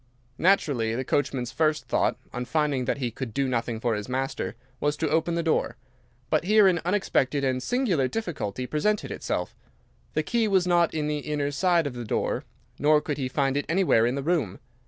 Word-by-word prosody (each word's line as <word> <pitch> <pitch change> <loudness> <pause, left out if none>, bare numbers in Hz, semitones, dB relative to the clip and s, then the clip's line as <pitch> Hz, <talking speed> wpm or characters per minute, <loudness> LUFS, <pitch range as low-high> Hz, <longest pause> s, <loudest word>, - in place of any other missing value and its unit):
"Naturally, 140 - +2
the 130 - -2
coachman's 130 -4 -1
first 155 +1 0
thought, - - +1 0.2
on 125 0 -3
finding 145 -3 0
that - - 0
he 125 -4 -2
could 115 -1 -6
do 140 -1 +1
nothing 115 -2 -1
for 115 0 0
his 105 +2 -4
master, 130 -1 -2 0.2
was 145 0 0
to 160 - 0
open 165 +3 +1
the 170 - 0
door. 160 - 0 0.5
But - - +2
here 210 +1 +6
an 175 -3 +2
unexpected 165 -7 +1
and 130 -1 0
singular 195 - +1
difficulty 130 - -3
presented 200 +10 0
itself. - - -3 0.6
The - - +1
key 235 -2 +1
was 190 -3 +3
not 175 -2 +2
in 155 -1 -1
the 150 0 -1
inner 145 -1 -2
side 175 +1 +2
of 140 - -3
the 120 -1 -5
door, 110 - -1 0.3
nor 150 +1 +5
could 150 -1 -4
he 130 - -1
find 135 0 0
it 145 - 0
anywhere 165 -10 +3
in 125 - 0
the 140 - -3
room. 150 - 0
145 Hz, 200 wpm, -26 LUFS, 130-170 Hz, 0.6 s, here